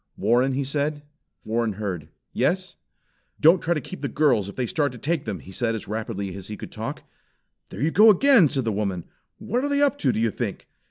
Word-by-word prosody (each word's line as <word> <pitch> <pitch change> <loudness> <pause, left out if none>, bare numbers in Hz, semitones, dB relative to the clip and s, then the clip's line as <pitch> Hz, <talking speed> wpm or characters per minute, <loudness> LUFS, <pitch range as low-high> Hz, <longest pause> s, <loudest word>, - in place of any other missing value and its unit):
"Warren?" 125 +3 +2
he 140 +2 -1
said. 145 +2 -2 0.4
Warren 115 0 0
heard. 95 -7 -5 0.2
"Yes!" - - 0 0.6
"Don't 170 +4 +6
try 170 +1 +1
to - - 0
keep 185 +7 -9
the - - -1
girls 125 -10 +2
if - - -10
they 125 - -1
start 145 +2 0
to - - -9
take 155 +4 -2
them," 105 -4 -3
he 95 - -12
said 115 +3 -1
as 110 - -6
rapidly 100 -3 -4
as 95 -2 -8
he 105 - -6
could - - -9
talk. - - -6 0.7
"There 105 - -5
they 160 - +2
go 215 +5 +7
again!" 215 - +6
said 135 -3 0
the 110 - +1
woman 100 -4 -2 0.3
"What 220 +5 -2
are 285 - 0
they 285 0 +2
up 280 -4 +2
to, 130 - +2
do 110 - -2
you 115 -1 +1
think?" - - -5
130 Hz, 225 wpm, -24 LUFS, 105-160 Hz, 0.7 s, go